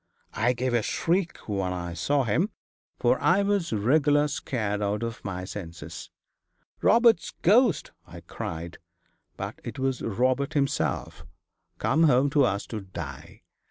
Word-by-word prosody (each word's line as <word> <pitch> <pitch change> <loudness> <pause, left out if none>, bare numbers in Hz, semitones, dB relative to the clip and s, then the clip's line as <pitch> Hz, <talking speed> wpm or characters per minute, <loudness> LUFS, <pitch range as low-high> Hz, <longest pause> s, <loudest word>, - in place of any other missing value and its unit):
I 120 +3 +2
gave 125 0 -2
a 120 - +3
shriek 170 - 0
when 95 -3 -1
I 85 -1 -4
saw 140 - +1
him, 150 - +1 0.5
for - - +2
I 200 - +4
was 200 -4 0
regular 145 +7 +3
scared 110 -7 -2
out 105 +2 -1
of 115 0 -5
my 90 -2 -4
senses. 85 -6 -8 0.7
"Robert's 230 -7 +4
ghost!" 215 - +4 0.2
I - - -11
cried; 85 +1 -6 0.6
but - - -5
it - - -7
was 130 -1 -1
Robert 130 +6 0
himself, 140 -2 -1 0.5
come 160 +4 +3
home 140 -1 +4
to 145 -2 +4
us 100 -3 -1
to 110 - -3
die. 95 -1 -9
125 Hz, 140 wpm, -27 LUFS, 100-150 Hz, 0.7 s, I